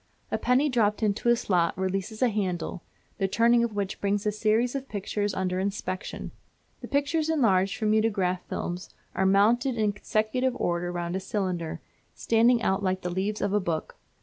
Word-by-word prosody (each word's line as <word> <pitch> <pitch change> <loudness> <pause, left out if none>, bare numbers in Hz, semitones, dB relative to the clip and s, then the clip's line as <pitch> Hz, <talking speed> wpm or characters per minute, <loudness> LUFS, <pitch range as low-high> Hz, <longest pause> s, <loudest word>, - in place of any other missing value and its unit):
A - - +1
penny 255 +4 +3
dropped 220 -5 +1
into 210 +3 +1
a 240 - +6
slot 180 -7 +1
releases 195 +5 -2
a 250 - +4
handle, 185 -4 -2 0.4
the 195 - +2
turning 235 +4 +4
of 230 -3 -2
which 200 -1 -3
brings 200 +1 0
a 210 - +2
series 220 +3 +1
of 275 -1 -5
pictures 205 0 -2
under 185 -1 -1
inspection. 195 -1 -4 0.5
The - - -8
pictures, 300 +3 0
enlarged 200 -11 +2
from 215 -1 +1
mutograph 200 -5 +1
films, 180 +1 -4 0.2
are 190 - +1
mounted 230 +6 +3
in 210 -2 +1
consecutive 220 +5 0
order 175 0 -1
round 175 0 -3
a - - 0
cylinder, 185 -4 -3 0.3
standing 230 +1 +3
out 190 +1 +1
like 185 -1 0
the 180 - -3
leaves 200 +3 -2
of 200 0 0
a 210 - +4
book. 170 -5 -3
205 Hz, 175 wpm, -27 LUFS, 185-230 Hz, 0.5 s, a